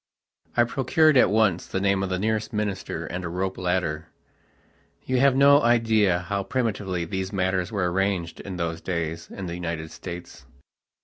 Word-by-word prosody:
I 120 - +6
procured 140 +5 +3
at 125 - +6
once 105 -4 +2
the 95 - -2
name 100 0 +1
of 95 - -2
the 95 - -1
nearest 110 +2 -1
minister 105 -3 -3
and 90 +2 -5
a 85 - -3
rope 95 +2 -2
ladderyou 90 -3 -1 1.1
have 135 0 +4
no 140 +1 +6
idea 110 -6 +3
how 100 +3 -2
primitively 100 -7 -2
these 95 +2 -3
matters 95 -2 0
were 95 -5 0
arranged 95 -3 -1
in 95 - -6
those 85 -1 -3
days 85 -2 -3
in 95 - -7
the 85 - -5
United 80 -2 -4
States. 90 -1 -9
95 Hz, 165 wpm, -25 LUFS, 90-110 Hz, 1.1 s, I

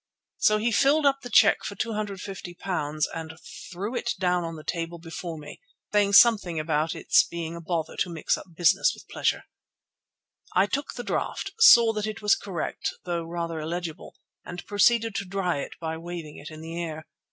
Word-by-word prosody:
So 215 - +4
he 225 +3 0
filled 285 +6 +3
up 275 -1 +3
the 245 - -8
cheque 215 -3 +5
for 200 - -5
£250 190 -7 -4
and 160 -1 -7 0.3
threw 200 +7 -4
it 235 - -1
down 180 -1 +1
on 165 0 -5
the 155 - -10
table 165 +1 -3
before 165 0 -7
me, 150 - -11 0.3
saying 205 -1 +3
something 200 -7 +6
about 155 0 0
its - - +4
being 170 -1 -5
a 170 - -7
bother 165 -1 -3
to - - 0
mix 165 -2 0
up - - -10
business 170 -1 +3
with - - -15
pleasure. - - -1 1.1
I 190 - +5
took 275 +7 -3
the 245 - -5
draft, - - -3
saw 235 - +8
that 215 0 -2
it 215 -1 -5
was 210 -1 +4
correct 185 -5 -4
though 170 -2 -2
rather 170 -1 -4
illegible, 165 +1 -5 0.3
and 175 0 -8
proceeded 225 +2 +3
to 200 - -3
dry 180 -4 -1
it - - -5
by 160 -1 -4
waving 170 -3 -7
it 150 - -9
in 155 0 -10
the 165 +1 -5
air. 160 -1 -6
175 Hz, 185 wpm, -26 LUFS, 165-210 Hz, 1.1 s, saw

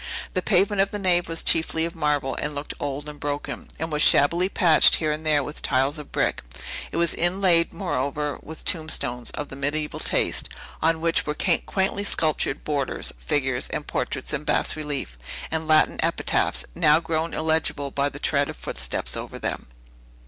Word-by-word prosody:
The 185 - 0
pavement 195 +1 +2
of 195 - +1
the 205 - -4
nave 175 -3 +2
was 165 0 0
chiefly 160 0 +2
of 170 - -6
marble, 150 -4 0
and 150 0 -3
looked 145 +1 -4
old 145 +1 -4
and 150 -1 -8
broken, 145 0 -4
and 160 +1 -4
was 150 0 0
shabbily 170 +7 +5
patched 170 -6 +5
here 155 -2 0
and 155 +1 -3
there 150 -2 +3
with 150 +3 -4
tiles 135 +3 +1
of 150 - -10
brick; - - 0 0.5
it - - -4
was 170 0 +2
inlaid, 175 -1 +3
moreover, 145 -5 -2
with 160 +1 -10
tombstones 155 -7 0
of 145 - -5
the - - -8
mediaeval 145 +2 -2
taste, - - 0 0.3
on 160 0 +2
which 165 -1 +1
were 150 - -1
quaintly 190 +3 0
sculptured 155 -7 0
borders, 140 -4 -2
figures, 130 - 0
and - - -4
portraits - - -3
in - - -2
bas - - +2
relief, 145 - -4 0.3
and 160 0 -2
Latin 155 0 +4
epitaphs, - - 0
now 150 - +4
grown 165 0 -2
illegible 155 -3 0
by 140 +1 0
the 145 - -9
tread 140 -1 +1
of - - -7
footsteps - - -2
over - - -6
them. - - -4
155 Hz, 180 wpm, -24 LUFS, 145-165 Hz, 0.5 s, shabbily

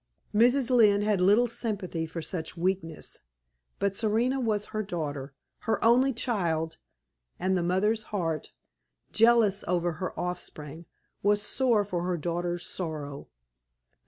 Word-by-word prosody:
Mrs. 245 +4 +4
Lynne 210 -4 +5
had 210 -3 +1
little 205 +6 +5
sympathy 205 -9 -3
with 165 -2 -5
such 165 0 -5
weakness; 170 -3 -2 0.6
but 200 -1 0
Serena 230 +5 +1
was 215 -4 0
her 215 - 0
daughter 145 -8 -4 0.3
her 220 0 +1
only 255 +4 +5
child 170 -10 -1 0.6
and 190 +1 +1
the 180 - +1
mother's 210 +5 +1
heart, 165 -8 -3 0.6
jealous 225 -3 +4
over 175 -1 +1
her 185 - -3
offspring, 165 -3 -6 0.3
was 205 +1 +3
sore 235 -4 +2
for 180 -3 -2
her 180 0 -1
daughter's 175 +1 -2
sorrow. 150 -5 -5
190 Hz, 130 wpm, -28 LUFS, 170-220 Hz, 0.6 s, Lynne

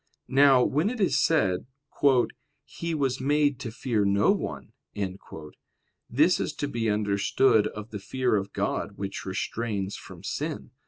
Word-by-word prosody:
Now 135 -2 +6
when 155 +11 +1
it 250 0 -5
is 195 - +2
said, 110 - +1 1.0
"He 170 -1 -4
was 135 -3 -1
made 145 -1 +2
to 125 - -5
fear 110 -2 -1
no 100 +1 +3
one," - - -4 1.4
this 155 +9 +3
is - - -2
to 145 - -3
be 115 -5 -1
understood 105 +2 +2
of 105 +2 -8
the 105 - -5
fear 125 +4 0
of 100 -1 -2
God - - -2
which 95 -1 -5
restrains 100 0 -3
from - - -11
sin. - - -4
120 Hz, 145 wpm, -27 LUFS, 105-145 Hz, 1.4 s, Now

